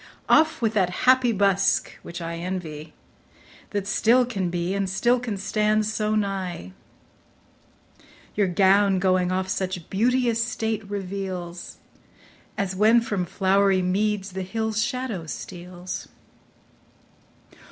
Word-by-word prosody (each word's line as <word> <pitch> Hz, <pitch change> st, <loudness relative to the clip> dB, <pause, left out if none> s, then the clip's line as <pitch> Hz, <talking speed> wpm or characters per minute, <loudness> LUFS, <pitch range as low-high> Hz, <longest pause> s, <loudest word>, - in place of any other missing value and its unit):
Off 315 Hz, -5 st, +3 dB
with 220 Hz, -1 st, +2 dB
that 190 Hz, -5 st, +2 dB, 0.2 s
happy 255 Hz, -1 st, +5 dB
busk, 195 Hz, -2 st, +2 dB
which 170 Hz, +1 st, -8 dB
I 165 Hz, 0 st, -4 dB
envy, 165 Hz, -4 st, -5 dB, 0.8 s
That 205 Hz, -2 st, -2 dB
still 230 Hz, +4 st, +3 dB
can 195 Hz, -7 st, -2 dB
be, 175 Hz, +1 st, -2 dB
and 195 Hz, -1 st, -1 dB
still 240 Hz, +6 st, +2 dB
can 235 Hz, -5 st, -4 dB
stand 215 Hz, +2 st, +1 dB
so 215 Hz, 0 st, -1 dB
nigh. 190 Hz, -, -3 dB, 1.6 s
Your 205 Hz, -2 st, +2 dB
gown 195 Hz, +2 st, +4 dB
going 185 Hz, -1 st, +2 dB
off 185 Hz, 0 st, -1 dB
such 185 Hz, -2 st, -3 dB
beauteous 235 Hz, +2 st, +2 dB
state 220 Hz, -2 st, -2 dB
reveals, 185 Hz, -3 st, -5 dB, 0.8 s
As 190 Hz, -2 st, -2 dB
when 220 Hz, +4 st, +5 dB
from 205 Hz, -5 st, -2 dB
flowery 195 Hz, 0 st, +2 dB
meads 200 Hz, +1 st, 0 dB
th' -, -, -9 dB
hill's 220 Hz, +3 st, -2 dB
shadow 235 Hz, -8 st, -3 dB
steals. 180 Hz, +2 st, -7 dB
195 Hz, 120 wpm, -24 LUFS, 185-215 Hz, 1.6 s, happy